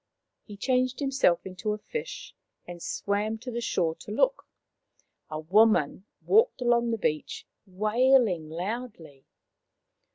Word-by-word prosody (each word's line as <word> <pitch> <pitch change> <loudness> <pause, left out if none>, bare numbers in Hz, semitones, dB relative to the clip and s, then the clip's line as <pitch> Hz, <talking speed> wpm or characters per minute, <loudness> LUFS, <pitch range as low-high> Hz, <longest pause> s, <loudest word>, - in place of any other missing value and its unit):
He 205 -2 -10
changed 255 +3 0
himself 270 - +2
into 190 +3 -3
a - - -4
fish 470 - -7 0.3
and 175 -1 -9
swam 205 +5 -2
to 250 +3 -7
the 235 0 -3
shore 170 -8 0
to - - -12
look. - - +1 0.8
A 155 - -4
woman 190 +1 +3 0.2
walked 450 - +4
along 240 -1 +2
the 225 - 0
beach, 155 -7 -2 0.2
wailing 215 -3 +2
loudly. 175 - -6
215 Hz, 125 wpm, -27 LUFS, 180-250 Hz, 0.8 s, walked